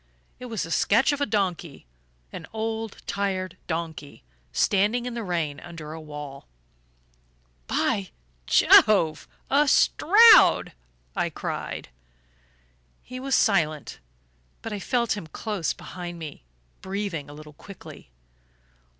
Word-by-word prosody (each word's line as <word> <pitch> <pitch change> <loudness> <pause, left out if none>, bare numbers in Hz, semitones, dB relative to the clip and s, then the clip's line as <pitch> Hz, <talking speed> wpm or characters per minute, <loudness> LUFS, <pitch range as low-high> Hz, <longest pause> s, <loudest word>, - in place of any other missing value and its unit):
It 250 - -8
was 225 -4 -3
a 165 - -9
sketch 230 - +3
of 285 0 -3
a 285 - +1
donkey 180 - -2 0.5
an - - -8
old 225 -1 -4
tired 190 -2 -2
donkey, 160 - -5 0.3
standing 210 - +1
in 250 - -4
the 235 - -4
rain 165 -7 -2
under 160 -3 -9
a 160 - -8
wall. 150 -2 -9 1.2
"By 95 -2 0 0.4
Jove 165 - +5 0.2
a 285 +2 +4
Stroud!" 425 +11 +6 0.4
I - - 0
cried. - - -5 1.1
He 255 +1 -8
was 270 0 0
silent; 155 - +1 0.6
but 225 - -5
I 205 - -4
felt 235 +2 0
him 195 -6 -7
close 200 +1 -3
behind 175 -1 -8
me, 150 - -9 0.4
breathing 190 -6 -4
a - - -10
little 150 0 -12
quickly. 195 - -13
190 Hz, 120 wpm, -25 LUFS, 155-225 Hz, 1.2 s, Stroud